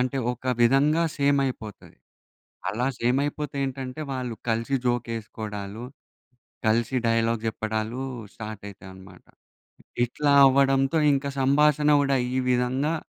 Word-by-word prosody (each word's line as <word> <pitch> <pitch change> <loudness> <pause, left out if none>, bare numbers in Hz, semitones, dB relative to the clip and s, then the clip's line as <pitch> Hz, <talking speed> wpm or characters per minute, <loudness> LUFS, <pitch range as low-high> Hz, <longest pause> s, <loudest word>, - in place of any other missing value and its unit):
అంటే 130 +2 -1 0.2
ఒక 125 - -13 0.2
విధంగా 140 +7 +4
సేమ్ 140 0 +2
అయిపోతది. 110 -6 -7 0.7
అలా 120 +5 -1
సేమ్ 125 +3 +1
అయిపోతే 145 0 -4
ఏంటంటే, 130 +1 -5
వాళ్ళు 125 -3 -4
కలిసి 115 +4 0
జోక్ 120 -1 0
ఎసుకోడాలు, 105 0 -7 0.8
కలిసి 115 +4 +1
డైలాగ్ 115 0 +1
చెప్పడాలు 110 +2 -3 0.3
స్టార్ట్ 110 -2 -8
అయితాయన్నమాట. 95 -1 -14 0.8
ఇట్లా 145 +4 0
అవ్వడంతో 135 +2 +3
ఇంక 140 0 -1
సంభాషణ 150 +2 +3
కూడా 140 -1 +2 0.2
ఈ - - 0
విధంగా 130 +5 +1
125 Hz, 115 wpm, -25 LUFS, 110-140 Hz, 0.8 s, విధంగా